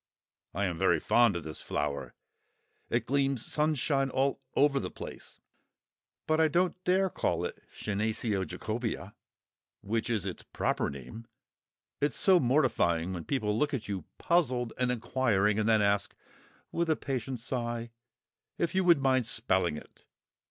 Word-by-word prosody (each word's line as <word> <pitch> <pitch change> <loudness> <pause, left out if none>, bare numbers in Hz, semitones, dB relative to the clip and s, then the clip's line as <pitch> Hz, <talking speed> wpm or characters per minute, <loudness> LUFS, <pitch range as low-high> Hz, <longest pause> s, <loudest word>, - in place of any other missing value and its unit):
I 100 +2 +1
am 85 -3 -3
very 95 - +3
fond 120 -5 +4
of 85 - -3
this 80 0 -7
flower; 75 -1 -3 0.7
it 120 -1 0
gleams 135 -2 +1
sunshine 150 -2 +1
all 135 +1 0
over 140 -1 +4
the - - -4
place; - - -9 0.9
but 155 0 +2
I 160 - +5
don't 175 +4 +1
care 185 +2 +3
to - - -9
call - - 0
it - - -6 0.2
Senecio 105 -1 0
Jacobœa, 110 +6 -4 0.7
which 115 +3 -2
is 110 -5 0
its 95 - -5
proper - - -1
name; 70 - -9 0.7
it's 145 -3 +1
so 190 -2 +5
mortifying 95 - +2
when 85 -3 -5
people 105 -7 0
look 145 +5 +1
at 120 - -5
you 95 -5 -4
puzzled 130 -9 +1
and 125 -1 +2
inquiring, 110 -4 +1
and 110 +1 +1
then 110 -2 +4
ask, 100 0 +1 0.6
with 170 -1 -1
a 160 - +4
patient 130 -3 -3
sigh, 120 -1 -3 0.7
if 170 - 0
you 190 0 +2
would 170 -3 +6
mind 130 -3 +2
spelling 95 -9 +1
it! - - -14
120 Hz, 150 wpm, -30 LUFS, 100-140 Hz, 0.9 s, would